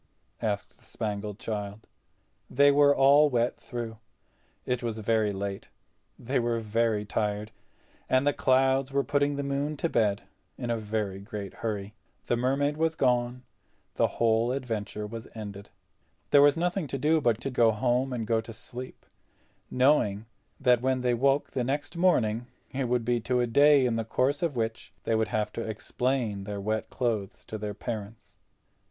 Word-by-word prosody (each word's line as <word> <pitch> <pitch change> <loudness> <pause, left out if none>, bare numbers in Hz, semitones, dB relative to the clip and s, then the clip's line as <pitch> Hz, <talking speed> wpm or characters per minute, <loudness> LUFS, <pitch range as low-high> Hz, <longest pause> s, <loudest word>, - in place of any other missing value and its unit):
asked 105 -3 -3
the - - -24
Spangled 105 -2 -4
Child. 105 -3 -5 0.6
They 140 +2 +5
were 145 0 +5
all 145 +2 +6
wet 120 -2 0
through. 115 -2 -6 0.7
It 125 -1 -1
was 115 -2 -3
very 110 -1 +1
late—they 100 +6 -5
were 120 -1 0
very 110 -1 0
tired, 105 +1 -2 0.6
and 130 +2 +3
the 145 - +3
clouds 130 +1 +2
were 140 0 +1
putting 145 +2 +1
the 140 - -2
moon 140 +2 -2
to 170 - -1
bed 105 -6 +1 0.3
in 120 - -3
a 115 - 0
very 105 -3 -3
great 100 -1 -7
hurry. 105 -2 -4 0.3
The - - +1
Mermaid 135 +4 0
was 160 0 +1
gone; 125 -2 +1 0.5
the - - +2
whole 115 +1 +3
adventure 110 -5 -3
was 115 +2 -7
ended. 100 -2 -8 0.6
There 145 - +7
was 145 +2 +5
nothing 175 0 -1
to 135 - -3
do 155 +3 +2
but 120 -4 +2
to 135 - -3
go 120 -2 +4
home, 125 +4 0
and 120 -3 -2
go 110 0 +1
to 115 +1 -10
sleep, 125 +4 -9 0.6
knowing 125 -6 +2 0.3
that 125 -3 +4
when 130 0 +1
they 125 -1 +2
woke 135 +4 +2
the 125 - -1
next 145 +5 -2
morning 120 -10 +2 0.2
it 135 0 -2
would 120 -1 0
be 120 0 +1
to 125 +2 0
a 120 - +3
day 140 +3 +5
in 115 -2 +1
the 115 - -1
course 130 +5 0
of 165 -5 0
which 115 -1 -3
they - - 0
would 110 0 +2
have 105 0 -1
to - - -4
explain 110 -1 -2
their 105 -1 -4
wet 110 +2 -2
clothes 110 -6 -2
to 110 - -6
their 105 -1 -4
parents. 110 -1 -7
120 Hz, 170 wpm, -28 LUFS, 110-135 Hz, 0.7 s, There